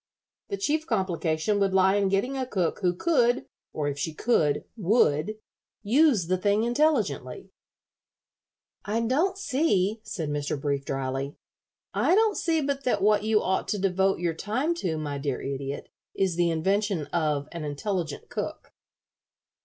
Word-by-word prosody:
The 400 - -2
chief 315 -4 0
complication 185 -2 0
would 195 -1 +1
lie 190 0 +5
in 200 -1 +2
getting 200 +8 0
a 260 -1 -2
cook 185 -8 -1
who 180 -3 +1
could, 245 - +2 0.3
or 150 -1 -2
if 145 0 -3
she 155 +2 -3
could, 155 -11 +2
would, 205 -3 +2 0.5
use 245 - +4
the 185 +2 0
thing 205 +3 +2
intelligently." 220 - 0 1.3
"I 220 +3 -1
don't 315 +12 +1
see," 230 - +1
said 165 -8 -4
Mr. 145 0 -2
Brief, 140 -1 -1
dryly 135 +1 -3 0.6
"I 360 - +3
don't 435 -1 +3
see 325 -2 +1
but 275 -1 -2
that 250 - +1
what 210 0 +4
you 215 -1 +2
ought 190 +1 0
to 210 - -1
devote 195 0 +1
your 170 -1 -1
time 245 - -1
to, 165 - -2
my 145 -2 -3
dear 140 -2 -2
Idiot, 140 0 -5 0.3
is 190 -3 +1
the 175 0 +2
invention 190 +1 0
of 150 -4 0
an 170 -2 -6
intelligent 155 +1 -3
cook." - - -5
190 Hz, 155 wpm, -27 LUFS, 155-235 Hz, 1.3 s, lie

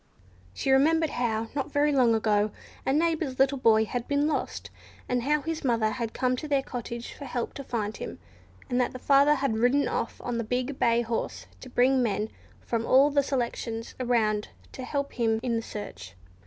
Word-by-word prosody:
She 270 - 0
remembered 315 +4 +4
how, 225 -2 -1
not 290 +1 -2
very 290 +1 +3
long 250 -5 +4
ago, 210 -1 +2 0.4
a - - +3
neighbour's 315 -3 +1
little 270 0 +3
boy 220 -2 +4
had 245 +2 -4
been 285 +1 +2
lost, 310 - -3 0.4
and 250 -1 0
how 295 +4 +1
his 325 -1 -3
mother 230 -4 +2
had 230 -2 -3
come 255 +1 0
to 305 - -5
their 280 -2 +1
cottage 235 -1 -6
for 285 - -9
help 245 -2 -3
to 275 - -7
find 220 -4 -3
him, - - -6 0.5
and 250 -1 +1
that 250 - -1
her - - -5
father 280 +3 +4
had 265 -6 -1
ridden 255 +5 +3
off - - -3
on 240 -1 -2
the - - -1
big 250 +4 -2
bay 235 0 +3
horse 100 - -3
to - - -10
bring 255 +1 +3
men 215 -2 0 0.3
from 230 -1 -2
all 270 +4 +5
the 285 0 +3
selections 235 -4 -3
around 220 -4 +1 0.2
to 260 - -7
help 280 -1 -3
in 225 -1 +2
the 230 -1 -1
search. 205 - -8
250 Hz, 195 wpm, -27 LUFS, 225-280 Hz, 0.5 s, all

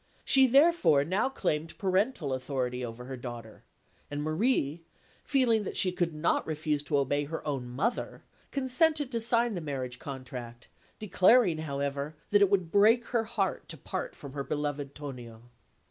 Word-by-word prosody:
She 265 -2 +6
therefore 275 - +5
now 190 - +1
claimed 160 - -2
parental 190 - 0
authority 125 -1 -3
over 120 +1 -7
her 130 +1 -6
daughter; 120 -3 -9 0.5
and 145 0 -4
Marie, 160 - 0 0.4
feeling 240 -6 +2
that - - -4
she 185 - +3
could 175 -2 -1
not 155 +2 0
refuse 155 -2 -1
to 145 -1 +1
obey 145 +1 0
her 160 +1 -6
own 135 -4 -3
mother, 180 - -2 0.3
consented 280 +2 +1
to 230 -2 -1
sign 235 0 +2
the 180 - -4
marriage 130 -5 -5
contract, 125 -4 -8 0.3
declaring, 200 -3 +4
however, 140 0 -3 0.2
that 205 0 +5
it 200 - +5
would 185 -4 +1
break 220 +5 +5
her 230 -2 0
heart 215 -4 -2
to 160 - -7
part - - -5
from 140 -2 -10
her 140 -1 -3
beloved 145 -1 -3
Tonio. 120 -6 -9
155 Hz, 160 wpm, -29 LUFS, 140-220 Hz, 0.5 s, She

